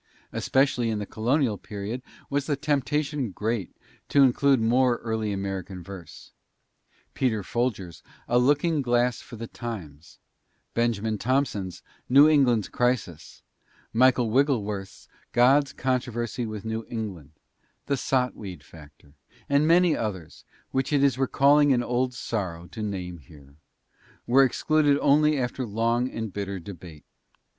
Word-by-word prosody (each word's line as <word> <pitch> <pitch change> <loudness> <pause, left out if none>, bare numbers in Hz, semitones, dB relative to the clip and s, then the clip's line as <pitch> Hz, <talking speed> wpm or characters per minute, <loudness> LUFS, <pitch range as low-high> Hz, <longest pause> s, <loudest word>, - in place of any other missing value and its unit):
Especially 130 -3 +1
in 110 - -1
the 105 - -4
colonial 120 +1 0
period 105 +4 -6 0.3
was 140 -1 -2
the 145 - +1
temptation 145 -1 -1
great 105 0 -3 0.3
to 140 - +5
include 135 +1 +4
more 120 +2 +3
early 110 -2 -2
American 95 -2 -4
verse. 90 -3 -11 0.8
Peter 110 -6 0
Folger's 100 -7 -3 0.3
"A 120 - +3
Looking 145 +4 +2
Glass 120 -1 +1
for - - -11
the 115 +1 -6
Times," 90 -12 -8 0.6
Benjamin 110 -2 0
Tompson's 115 -8 -1 0.3
"New 140 +4 +8
England's 130 -9 +3
Crisis," 120 -10 -2 0.5
Michael 125 -1 +3
Wigglesworth's 105 -7 -1 0.3
"God's 135 +3 +4
Controversy 120 -3 -2
with 110 -1 -7
New 110 0 -3
England," 95 - -6 0.5
the 140 - 0
"Sot 125 -1 0
Weed 90 -8 -9
Factor," 75 -2 -16 0.3
and 140 +2 +3
many 175 0 +5
others, 95 -8 -5 0.3
which 130 +2 -1
it 140 -2 +3
is 135 -2 +2
recalling 140 +2 +4
an 120 -1 +1
old 125 +1 -1
sorrow 95 -8 -4
to 110 - -8
name 90 -4 -4
here, 70 0 -17 0.7
were 135 +3 +5
excluded 145 +2 +2
only 150 +1 +4
after 130 0 -2
long 115 +3 0
and 110 -5 -5
bitter 100 -1 -4
debate. 85 -4 -11
120 Hz, 130 wpm, -26 LUFS, 100-135 Hz, 0.8 s, New